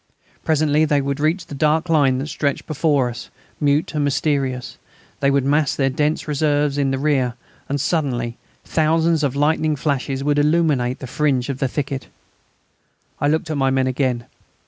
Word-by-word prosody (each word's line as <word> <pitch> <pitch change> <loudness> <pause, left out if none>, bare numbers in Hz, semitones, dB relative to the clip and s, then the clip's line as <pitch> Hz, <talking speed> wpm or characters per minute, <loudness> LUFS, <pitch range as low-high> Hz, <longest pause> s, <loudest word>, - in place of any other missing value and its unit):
Presently 155 -1 +2
they 150 -2 +2
would 140 +1 -2
reach 165 +4 0
the - - -10
dark 155 +4 +1
line 145 -6 +3
that 135 - -3
stretched 145 -2 -2
before 145 -4 +1
us, 120 -2 -7 0.3
mute 145 +2 +1
and 150 -1 0
mysterious; 135 -3 -1 0.4
they 140 - +2
would 140 -1 +2
mass 145 +1 +2
their 135 -1 +1
dense 150 +4 -1
reserves 145 -1 +1
in 140 -1 +2
the 135 - 0
rear, 135 -4 +1 0.3
and 145 +1 -1
suddenly 130 -7 -1 0.3
thousands 160 0 +2
of 140 -2 0
lightning 155 +1 +1
flashes 135 -2 -2
would 145 0 +2
illuminate 145 -5 +2
the - - -8
fringe 130 -1 0
of 135 -1 -3
the 135 - +1
thicket. 135 0 -4 1.1
I 145 - +1
looked 160 +2 0
at 155 - -1
my 135 -1 +2
men 130 0 +1
again. 130 -2 -1
145 Hz, 170 wpm, -21 LUFS, 135-155 Hz, 1.1 s, line